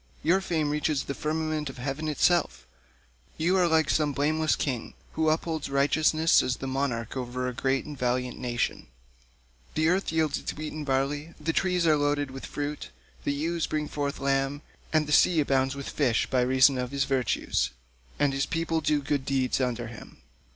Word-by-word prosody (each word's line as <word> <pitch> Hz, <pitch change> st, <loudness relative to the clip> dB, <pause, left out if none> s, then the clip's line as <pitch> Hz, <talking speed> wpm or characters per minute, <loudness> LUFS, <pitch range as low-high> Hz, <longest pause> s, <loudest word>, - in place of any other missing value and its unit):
Your 180 Hz, +5 st, +3 dB
fame 160 Hz, -5 st, 0 dB
reaches 150 Hz, -1 st, 0 dB
the 140 Hz, -, -4 dB
firmament 155 Hz, 0 st, -2 dB
of 135 Hz, -, -9 dB
heaven 135 Hz, +5 st, -3 dB
itself; 170 Hz, +2 st, +1 dB, 0.7 s
you 170 Hz, +4 st, +2 dB
are 180 Hz, -2 st, +4 dB
like 160 Hz, -2 st, +3 dB
some 150 Hz, -2 st, +1 dB
blameless 155 Hz, +3 st, +1 dB
king, 125 Hz, -5 st, -3 dB, 0.2 s
who 160 Hz, 0 st, +1 dB
upholds 160 Hz, -1 st, -1 dB
righteousness, 155 Hz, +3 st, +3 dB
as 125 Hz, -, -1 dB
the 135 Hz, -, -7 dB
monarch 130 Hz, -4 st, -2 dB
over 125 Hz, 0 st, -3 dB
a 125 Hz, -, -3 dB
great 135 Hz, +2 st, 0 dB
and 150 Hz, -, -7 dB
valiant 125 Hz, -1 st, -1 dB
nation: 120 Hz, -1 st, -2 dB, 0.9 s
the 155 Hz, +1 st, +3 dB
earth 185 Hz, 0 st, +1 dB
yields 160 Hz, -2 st, +1 dB
its -, -, -5 dB
wheat 155 Hz, 0 st, -5 dB
and 155 Hz, -1 st, -6 dB
barley, 145 Hz, +4 st, -1 dB
the 165 Hz, -, -1 dB
trees 180 Hz, -1 st, +1 dB
are 155 Hz, -2 st, +5 dB
loaded 145 Hz, -1 st, 0 dB
with 135 Hz, 0 st, -7 dB
fruit, 145 Hz, 0 st, -4 dB, 0.4 s
the -, -, +1 dB
ewes 160 Hz, +3 st, -1 dB
bring 150 Hz, -1 st, -2 dB
forth 145 Hz, -1 st, -3 dB
lambs, 135 Hz, +1 st, 0 dB, 0.3 s
and 155 Hz, -1 st, +3 dB
the 150 Hz, -, -5 dB
sea 165 Hz, +2 st, +5 dB
abounds 135 Hz, -2 st, +1 dB
with 140 Hz, -1 st, -6 dB
fish 125 Hz, -6 st, +1 dB
by 130 Hz, -, +1 dB
reason 130 Hz, +1 st, +4 dB
of 125 Hz, -1 st, -2 dB
his 140 Hz, +1 st, 0 dB
virtues, 130 Hz, -, 0 dB, 0.5 s
and 145 Hz, -1 st, +2 dB
his 135 Hz, +1 st, 0 dB
people 165 Hz, 0 st, -1 dB
do 150 Hz, -2 st, +1 dB
good 140 Hz, 0 st, -1 dB
deeds 130 Hz, -1 st, 0 dB
under 120 Hz, -2 st, -1 dB
him. 115 Hz, -1 st, -11 dB
145 Hz, 185 wpm, -27 LUFS, 135-155 Hz, 0.9 s, are